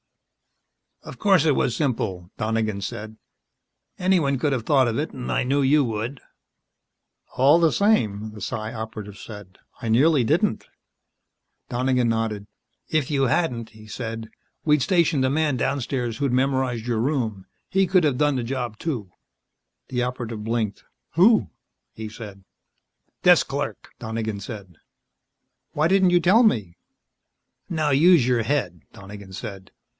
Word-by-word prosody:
"Of - - -10
course 190 -7 +4
it 150 -4 +3
was 120 - 0
simple," 110 - -2
Donegan 110 -2 -1
said. 110 +1 -6 0.8
"Anyone 175 -7 +2
could 145 +3 0
have 120 -4 -2
thought 135 -4 +4
of 115 - -1
it 155 - -2
and 125 -2 -5
I - - +1
knew 140 +3 +1
you 145 +2 +4
would." 115 +3 -4 1.2
"All 140 +6 +6
the 165 -2 +4
same," 110 - +1
the 105 -1 -11
Psi 110 +3 -4
Operative 110 -3 -7
said, 105 -5 -11 0.2
"I 115 - -4
nearly 135 +4 +4
didn't." 110 - +1 1.0
Donegan 125 -1 +1
nodded. 110 -2 -1 0.4
"If 155 -4 0
you 140 -2 +1
hadn't," 125 -5 0
he 110 -1 -15
said, 115 0 -6 0.3
"we'd 150 -2 +3
stationed 165 -7 +2
a - - +2
man 150 -1 +1
downstairs 125 -3 -2
who'd 140 -2 0
memorized 130 -3 0
your 120 -2 -1
room. 115 -7 -1 0.2
He 190 0 +2
could 185 -1 +3
have 145 -5 +1
done 145 0 +2
the 125 - -1
job, 120 -3 -4
too." 115 - -4 0.8
The 125 -1 -1
Operative 120 -3 -4
blinked. 110 -2 -2 0.3
"Who?" 205 +7 +4 0.4
he 110 -1 -7
said. 105 -3 -10 0.8
"Desk - - +6
clerk," - - -4
Donegan 110 -2 -4
said. 100 - -9 1.0
"Why 155 +2 +2
didn't 190 0 +4
you 175 - +5
tell 200 +8 +5
me 105 - +1 0.4
" - - -55
"Now, 155 -3 0
use 150 -1 +5
your 120 -2 +2
head," 110 - -1
Donegan 100 -2 -11
said. 95 0 -8
125 Hz, 145 wpm, -23 LUFS, 110-145 Hz, 1.2 s, All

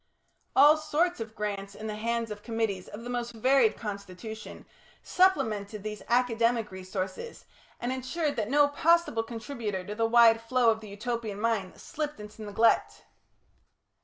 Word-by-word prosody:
All 295 +3 +7
sorts 315 +2 0
of 220 -1 -6
grants 200 -1 -4
in 215 - -8
the 215 - -3
hands 230 +1 -2
of 205 0 -7
committees 220 -5 -2
of 220 +3 -9
the 240 - -7
most 240 -1 -3
varied 245 0 +3
constitution, 205 +1 -7 0.4
supplemented 215 - +1
these 210 -1 -5
academic 235 -2 +2
resources, 190 - -6 0.3
and 245 - -2
ensured 285 +4 -2
that 215 -2 -2
no 290 +1 +5
possible 330 -4 +2
contributor 225 -4 -5
to 205 - -5
the 225 +1 +1
wide 230 -1 +6
flow 235 0 +3
of 220 - -2
the 215 -2 -11
Utopian 215 0 -4
mind 215 -4 -1
slipped 300 -4 -5
into 210 +1 -10
neglect. 205 - +1
225 Hz, 150 wpm, -28 LUFS, 210-250 Hz, 0.4 s, All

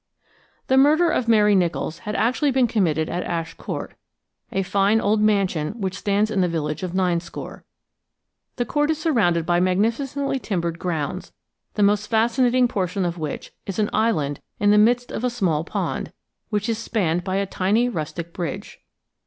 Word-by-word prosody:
The 265 - +2
murder 310 +5 +5
of 235 - 0
Mary 210 -2 +5
Nicholls 170 -3 0
had 210 - -2
actually 250 +7 +1
been 260 -1 +3
committed 165 -9 +1
at 180 - -2
Ash 165 -1 -3
Court, - - -6 0.6
a 195 - 0
fine 200 +3 +2
old 210 0 +1
mansion 195 -3 +1
which 190 -2 -2
stands 205 +1 +1
in 195 - +1
the 180 - +3
village 155 -1 -2
of 185 -1 -4
Ninescore. 175 -2 -2 0.9
The 245 - -1
Court 295 +5 0
is 320 - +1
surrounded 210 - +1
by 175 0 +2
magnificently 235 +10 0
timbered 170 -7 -2
grounds, 160 -5 -3 0.4
the 210 - +2
most 205 +1 +2
fascinating 240 +2 +3
portion 190 -3 -1
of 175 0 -3
which 155 -2 -5 0.2
is 195 - -4
an 210 -1 0
island 160 -11 0 0.2
in 205 0 +4
the 210 - +6
midst 245 +3 +3
of - - -4
a 250 - +2
small 180 -11 0
pond, - - -3 0.4
which 210 -1 -1
is 225 -1 -1
spanned 180 -7 -1
by 185 0 -2
a 200 0 +1
tiny 200 +5 +1
rustic 170 -4 -5
bridge. 170 -4 -5
200 Hz, 170 wpm, -23 LUFS, 175-230 Hz, 0.9 s, the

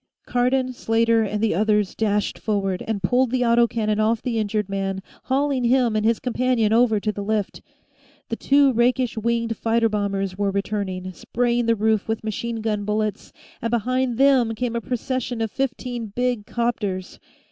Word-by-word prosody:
Cardon, 255 +1 +1
Slater, 230 -1 +2
and 210 0 -2
the 225 - +2
others 210 +1 +1
dashed 210 -2 -1
forward 195 -4 -1
and 210 -3 -2
pulled 245 +6 +2
the 250 0 +1
auto 235 0 +4
cannon 215 -2 -1
off 220 +1 +2
the 230 -2 -2
injured 210 -1 -1
man, 195 -1 -3 0.2
hauling 270 -1 +1
him 240 -2 +3
and 215 - +1
his 225 0 +2
companion 250 -3 +1
over 225 -2 +4
to 215 +1 -1
the 205 - -6
lift. 210 -1 -2 0.7
The 230 - -1
two 275 +2 +3
rakish 245 +1 +1
winged 230 0 -1
fighter 230 0 +2
bombers 200 -2 -2
were 200 0 0
returning, 195 -2 -3
spraying 240 +6 -1
the 230 - +4
roof 220 -1 +1
with 220 0 -2
machine 225 +1 -3
gun 210 -2 -1
bullets, 210 0 -2 0.3
and 230 - -1
behind 245 +1 0
them 260 -4 +4
came 235 0 -2
a 235 - -1
procession 250 0 -3
of 225 -2 -1
fifteen 250 -3 -3
big 245 0 -2
'copters. 210 -6 -2
225 Hz, 170 wpm, -23 LUFS, 210-245 Hz, 0.7 s, auto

